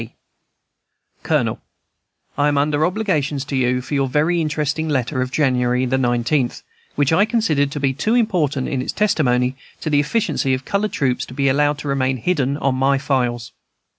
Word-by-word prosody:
S. - - -7
C. - - -26 1.1
COLONEL, - - 0 0.7
I 145 - +2
am 145 -1 +1
under 145 +1 +1
obligations 155 -9 -1
to 140 - -4
you 125 -1 +1
for 145 - -7
your 135 -1 +1
very 155 +6 +1
interesting 155 0 -1
letter 130 -1 -1
of 130 0 -3
January 125 -3 +1
19th, 125 +1 0 0.3
which 145 +1 +2
I 185 +5 +5
considered 210 - +1
to 145 - -5
be 135 -1 +1
too 215 - 0
important 170 - +1
in 130 - -2
its - - -4
testimony 130 -11 +1 0.3
to 155 - -3
the 145 - +4
efficiency 150 - 0
of 130 - -8
colored 205 +1 -1
troops 130 -3 0
to 125 - -11
be 140 0 +2
allowed 145 +2 +2
to 145 - -7
remain 130 -1 0
hidden 140 -1 0
on 135 -3 0
my 135 +2 +2
files. 125 -4 -1
140 Hz, 180 wpm, -20 LUFS, 130-155 Hz, 1.1 s, I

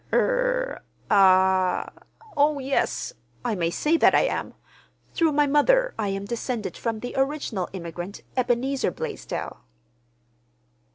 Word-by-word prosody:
"Er—ah—oh, 290 - +1
yes, 275 - -1 0.3
I 235 - 0
may 170 -4 0
say 300 - +1
that - - +5
I - - +5
am. - - -2 0.6
Through 325 -2 +2
my 295 0 +4
mother - - +3
I 210 - 0
am 195 0 -3
descended 235 0 -3
from 225 -2 -3
the 245 - -5
original 270 - -1
immigrant, 175 +1 -7
Ebenezer 255 +1 +1
Blaisdell." - - -6
245 Hz, 110 wpm, -25 LUFS, 195-300 Hz, 0.6 s, that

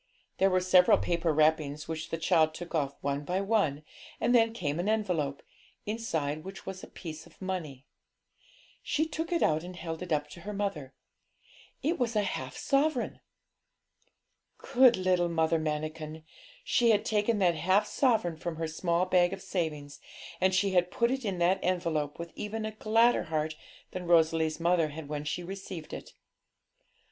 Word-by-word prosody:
There 195 - +5
were 185 -1 +2
several 180 0 +6
paper 170 -1 0
wrappings, 150 -1 +1
which 160 0 -4
the 165 - -2
child 160 -1 +3
took 175 +1 -8
off 140 -3 0
one 140 +1 -1
by 180 +5 -1
one, 195 -8 +1 0.4
and 240 - +2
then 225 -2 +5
came 165 -9 -3
an 185 +4 0
envelope, 180 -10 -1 0.4
inside 160 -9 -2
which 190 +1 -9
was 190 -1 -6
a - - -8
piece 160 -2 -9
of - - -22
money. 165 -8 -5 1.0
She 315 - 0
took 325 +2 -4
it 340 - +2
out 155 +1 +2
and 180 +1 -8
held 165 -1 -6
it 180 - -6
up 150 -1 +1
to - - -10
her 210 +3 -6
mother; 155 -10 -3 0.9
it 325 +3 0
was 240 -2 0
a 210 - +3
half 130 -9 -4
sovereign! 275 -2 0 1.4
Good 250 -2 +5
little 180 -2 +2
Mother 160 0 +2
Manikin! 155 0 -4 0.4
she 240 - +3
had 210 -2 +3
taken 210 +1 +1
that 180 -4 +3
half 185 +6 +2
sovereign 220 - +1
from 170 +1 -4
her 165 0 -3
small 170 +2 0
bag 180 0 +3
of 195 - -6
savings, 155 -7 -3 0.4
and 185 0 +3
she 195 +1 +2
had 180 -1 +3
put 235 +4 +1
it 265 0 -2
in 195 -4 -2
that 175 +2 +3
envelope 165 -5 -1
with 170 0 -7
even 215 +1 -4
a 215 - -3
gladder 225 +1 +3
heart 155 -1 -2 0.4
than 180 -1 -5
Rosalie's 160 -1 +3
mother 170 -1 +3
had 150 0 -8
when 150 0 -4
she 175 +4 -3
received 190 -3 -7
it. - - -8
175 Hz, 175 wpm, -30 LUFS, 155-200 Hz, 1.4 s, several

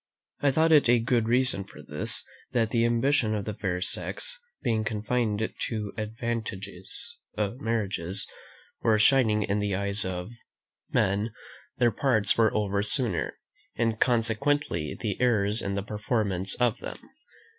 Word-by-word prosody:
I 145 - +3
thought 160 +4 +3
it 150 -6 +6
a 120 - +6
good 115 -1 +1
reason 125 -4 +4
for - - -13
this, - - +1 0.3
that 115 -3 +1
the 115 -1 +3
ambition 120 -1 +2
of 105 -1 -3
the 110 - -3
fair 90 -3 -2
sex - - -2 0.2
being 115 -4 +1
confined 110 0 0 0.2
to 105 -3 -4
advantageous 110 - -4 0.2
marriages, 100 -5 -2 0.5
or 110 -1 +3
shining 110 -2 +4
in 100 +1 0
the 100 -1 0
eyes 100 +1 +2
of 90 +2 -4 0.6
men, 100 +3 +1 0.5
their 120 -1 +4
parts 110 -2 +2
were 110 -2 +4
over 100 -1 +1
sooner, 110 - 0 0.4
and 115 -1 0
consequently 115 - +1
the 105 -1 -3
errors 110 -3 +2
in 100 0 -2
the 100 - -2
performance 105 -3 -1
of 120 -2 +1
them. - - -7
110 Hz, 140 wpm, -27 LUFS, 100-120 Hz, 0.6 s, it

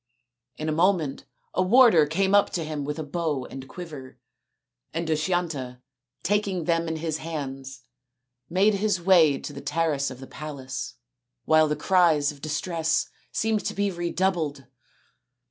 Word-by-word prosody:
In 155 - -4
a - - +1
moment 165 -4 +1 0.3
a - - +1
warder 190 - +6
came 190 +5 +1
up 205 0 +5
to 170 - -1
him 155 -2 -4
with 150 +1 -3
a 160 - -3
bow 150 -3 -2
and 135 0 -9
quiver, 150 -7 -9 0.8
and 165 +1 -1
Dushyanta, 155 -6 -1 0.4
taking 200 -3 0
them 165 +1 +1
in 160 - -2
his 160 -1 -2
hands, 135 -5 -6 0.7
made 195 +5 +3
his 205 -1 +1
way 170 -6 +5
to - - -7
the - - -8
terrace 145 -1 0
of 130 -1 -9
the 135 - -8
palace, 135 -3 -6 0.5
while 155 0 +5
the 150 - 0
cries 155 -3 +3
of 145 -2 -15
distress 160 +1 -1 0.2
seemed 220 -1 0
to - - -2
be 200 0 0
redoubled. 170 -5 -1
160 Hz, 150 wpm, -26 LUFS, 145-180 Hz, 0.8 s, warder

